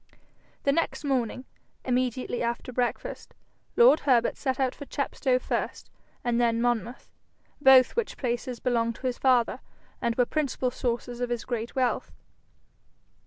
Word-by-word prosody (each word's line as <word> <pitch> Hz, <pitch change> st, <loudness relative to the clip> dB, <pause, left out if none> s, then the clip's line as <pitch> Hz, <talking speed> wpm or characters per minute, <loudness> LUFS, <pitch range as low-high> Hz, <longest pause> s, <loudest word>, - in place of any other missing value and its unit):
The 280 Hz, -, +3 dB
next 330 Hz, +2 st, -1 dB
morning, 255 Hz, -3 st, -1 dB, 0.4 s
immediately 250 Hz, -1 st, -1 dB
after 235 Hz, +1 st, -3 dB
breakfast, 245 Hz, 0 st, -3 dB, 0.4 s
lord 475 Hz, -9 st, +7 dB
Herbert 240 Hz, -4 st, +2 dB
set 265 Hz, -2 st, -2 dB
out 260 Hz, -1 st, +1 dB
for 285 Hz, -, -9 dB
Chepstow 270 Hz, -2 st, 0 dB
first -, -, -3 dB, 0.3 s
and 240 Hz, 0 st, +1 dB
then 230 Hz, -1 st, +2 dB
Monmouth, 240 Hz, 0 st, -2 dB, 0.5 s
both 265 Hz, -2 st, +7 dB
which 470 Hz, -2 st, -2 dB
places 245 Hz, -1 st, -3 dB
belonged 230 Hz, -2 st, 0 dB
to -, -, -11 dB
his 250 Hz, -1 st, -1 dB
father, 250 Hz, -3 st, +3 dB, 0.4 s
and 235 Hz, -1 st, 0 dB
were 245 Hz, -, +3 dB
principal 270 Hz, -3 st, -1 dB
sources 245 Hz, 0 st, -3 dB
of 245 Hz, -, -1 dB
his 240 Hz, -3 st, -3 dB
great 235 Hz, -2 st, -4 dB
wealth. 255 Hz, -2 st, 0 dB
250 Hz, 140 wpm, -27 LUFS, 240-260 Hz, 0.5 s, lord